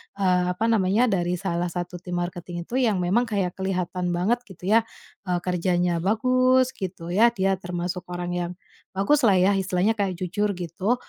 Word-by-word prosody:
eee, 185 -2 +2
apa 220 - -1
namanya, 220 +3 +3
dari 175 -2 0
salah 175 -1 -2
satu 175 +1 -5
tim 180 0 -6
marketing 175 0 -4
itu 255 - -1
yang 230 -5 +2
memang 225 +8 +2
kayak 195 -5 -1
kelihatan 180 -2 -1
banget 205 +8 +1
gitu 190 0 -5
ya, 225 +1 +4 0.4
eee, 180 - +1
kerjanya 175 -1 0
bagus 255 +6 +3
gitu 175 -3 -6
ya, 215 +6 +5
dia 195 -2 +1
termasuk 180 0 -4
orang 175 0 -4
yang 175 0 -2 0.4
bagus 200 +10 +3
lah 200 - +5
ya 185 +2 +4
istilahnya 190 +2 +1
kayak 195 -2 0
jujur 200 +3 -1
gitu, 185 +6 -1
185 Hz, 175 wpm, -24 LUFS, 175-205 Hz, 0.4 s, ya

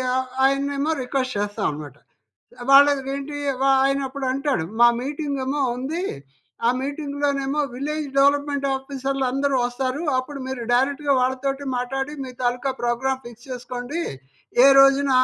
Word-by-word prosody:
ఆహ్, 260 0 0 0.2
ఆయన్నేమో 280 +2 +1
రిక్వెస్ట్ 255 -1 -2
చేస్తాం 205 0 -2
అన్నమాట. 145 -1 -7 0.8
వాళ్ళ 275 +1 +9 0.3
ఏంటి 280 +1 -6 0.3
వ - - +3 0.2
ఆయన 275 0 +2
అప్పుడు 270 0 -5
అంటాడు. 275 - 0 0.2
మా 240 - +9 0.2
మీటింగేమో 280 -1 -2 0.2
ఉంది, 300 +8 -3 0.6
ఆ - - +5
మీటింగ్‌లో 285 +1 -2
నేమో 275 +2 -1
విలేజ్ 300 +3 -3
డెవలప్మెంట్ 285 0 +2
ఆఫీసర్లందరూ 270 0 -1
వస్తారు. 255 +3 -2 0.2
అప్పుడు 275 +2 -5
మీరు 260 -2 -4
డైరెక్ట్‌గా 280 +3 +2
వాళ్ళతోటి 265 +2 -1
మాట్లాడి 270 +3 -2
మీ 260 - -7
తాలుకా 250 +2 0
ప్రోగ్రామ్ 260 +2 -1
ఫిక్స్ 240 +1 -12
చేసుకోండి. 250 +4 -5 0.6
ఏ - - +9
రోజున 275 +1 +5
270 Hz, 130 wpm, -23 LUFS, 255-280 Hz, 0.8 s, వాళ్ళ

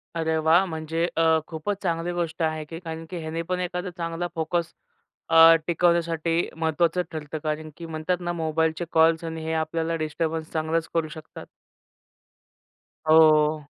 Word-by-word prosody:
अरे 160 -1 0
वाह! 160 +4 +4
म्हणजे 160 0 -2
अ, 165 - +3 0.2
खूपच 165 +5 -3
चांगली 170 -1 -1
गोष्ट 170 -1 -3
आहे 155 -1 -1
की 165 +2 -8
कारण 165 -2 -7
की 180 - -5
ह्याने 160 +1 -4
पण 180 +2 -2
एखादा 180 +1 -3
चांगला 170 0 -3
फोकस 165 +1 0 0.6
अ, 165 0 +8
टिकवण्यासाठी 170 -1 +1
महत्त्वाचं 165 +2 +1
ठरतं 155 -1 -5
कारण 155 0 -3
की 170 - -8
म्हणतात 160 +2 -2
ना, 175 0 -2
मोबाईलचे 160 0 -1
कॉल्स 160 0 +4
आणि 160 -1 -5
हे 160 - -2
आपल्याला 160 +1 -1
डिस्टर्बन्स 160 0 -3
चांगलाच 160 +1 -1
करू 165 -1 0
शकतात. 155 0 -10 1.6
हो. 155 -1 +5
165 Hz, 150 wpm, -25 LUFS, 160-170 Hz, 1.6 s, अ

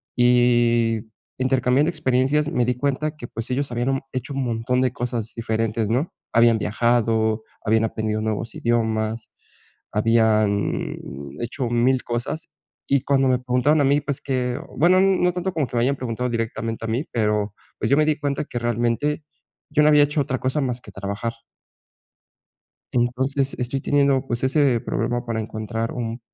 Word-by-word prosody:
y 120 -2 +3 0.4
intercambiando 130 +3 +2
experiencias, 150 0 +1
me 125 -7 +1
di 125 0 0
cuenta 145 +4 -1
que 120 - -7
pues, 115 +2 -6
ellos 135 0 -1
habían, 125 +3 0
mm, - - -3
hecho 130 +2 -4
un 135 -1 -1
montón 120 +2 0
de 130 -1 +1
cosas 120 -2 -3
diferentes, 110 -1 -1
¿no?, 130 +9 0 0.2
habían 115 -1 +5
viajado, 110 0 +1 0.2
habían 110 0 +2
aprendido 110 -1 -1
nuevos 110 +1 -3
idiomas, 110 -1 -1 0.6
habían 110 -1 +2 0.5
hecho 120 +1 -3
1000, 125 +2 +2
cosas. 120 +6 -3 0.4
Y 140 -2 +3
cuando 135 -1 +2
me 125 -1 +2
preguntaron 125 +5 +2
a - - +4
mí, 140 +2 +4
pues 140 -2 -4
que, 125 -2 -1 0.2
bueno, 180 +5 +5
no 185 -2 +3
tanto 180 +1 -2
como 150 -4 0
que - - -8
me - - +3
hayan 140 +2 +2
preguntado 125 0 -2
directamente 115 -1 -3
a - - -3
mí, 125 +7 -1
pero 105 -2 0 0.3
pues, 110 - -1
yo 140 - +4
me 155 - +4
di 155 -1 +1
cuenta 140 0 -1
que 120 - -4
realmente 120 +6 0 0.5
yo 150 0 +3
no 150 - +6
había 150 -1 +6
hecho 145 0 +1
otra 130 -1 -2
cosa 130 +3 0
más 125 -2 -2
que 105 - -13
trabajar. 100 +4 -4 1.6
Entonces 130 +3 0
estoy 125 +2 -2
teniendo, 140 -2 +2
pues, 120 0 -2
ese 130 -3 +3
problema 120 +3 -2
para 115 -2 -2
encontrar 110 +1 -4
un 120 -1 -4
120 Hz, 165 wpm, -23 LUFS, 115-135 Hz, 1.6 s, no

